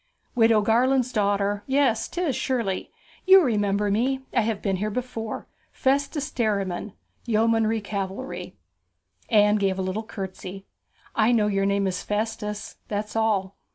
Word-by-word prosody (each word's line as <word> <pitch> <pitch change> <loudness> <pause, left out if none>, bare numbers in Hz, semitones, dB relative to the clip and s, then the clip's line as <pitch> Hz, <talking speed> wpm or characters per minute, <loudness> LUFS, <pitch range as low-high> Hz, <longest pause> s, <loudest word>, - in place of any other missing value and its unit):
'Widow 225 -2 +4
Garland's 250 +4 +2
daughter! 205 -1 +1
yes, 265 -4 +2
'tis! 345 -7 -1
surely. 230 -9 -1 0.4
You 380 -1 +9
remember 205 -4 +1
me? 260 +6 +1
I 240 - +3
have 220 -2 -1
been 195 -2 -1
here 210 +3 -1
before. 225 -1 -4 0.2
Festus 280 +2 0
Derriman, 200 -4 -1 0.3
Yeomanry 225 0 +2
Cavalry.' 200 +4 -5 0.7
Anne 210 -2 +5
gave 195 -2 0
a 190 - -1
little 185 +3 -2
curtsey. 195 -2 -7 0.5
'I 220 +1 +4
know 220 -3 +3
your 195 -1 +1
name 200 0 +1
is 185 -1 -1
Festus 210 0 -3
that's 210 +1 -4
all.' 205 -4 +1
215 Hz, 135 wpm, -25 LUFS, 200-235 Hz, 0.7 s, You